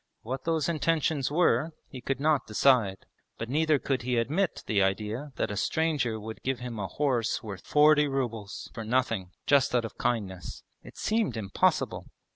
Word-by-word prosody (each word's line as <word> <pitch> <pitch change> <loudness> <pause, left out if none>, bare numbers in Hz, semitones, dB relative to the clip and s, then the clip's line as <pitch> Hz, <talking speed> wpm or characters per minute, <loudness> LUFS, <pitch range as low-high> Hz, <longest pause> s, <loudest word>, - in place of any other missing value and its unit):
What 130 +3 -5
those 160 -2 +1
intentions 160 -3 +1
were 155 -1 +2
he 130 - -9
could 135 +1 -2
not 150 -2 +2
decide, 105 -4 +3 0.3
but 115 - -5
neither 155 +2 +3
could 135 -2 -1
he 125 0 -1
admit 155 +11 0
the 105 -3 +2
idea 105 +8 -1
that - - -1
a - - -3
stranger 140 -2 0
would 110 +1 -8
give 130 0 -1
him 120 -3 -6
a 95 - -2
horse 125 -5 0
worth 100 -4 -7
forty 150 0 +5
rubles 120 -7 -4
for 115 - -5
nothing, 115 -5 0 0.2
just 140 -3 +3
out 120 -2 +2
of 115 - -9
kindness; 100 -7 -2 0.2
it - - -14
seemed 215 - 0
impossible. 100 -3 0
125 Hz, 170 wpm, -28 LUFS, 110-150 Hz, 0.3 s, forty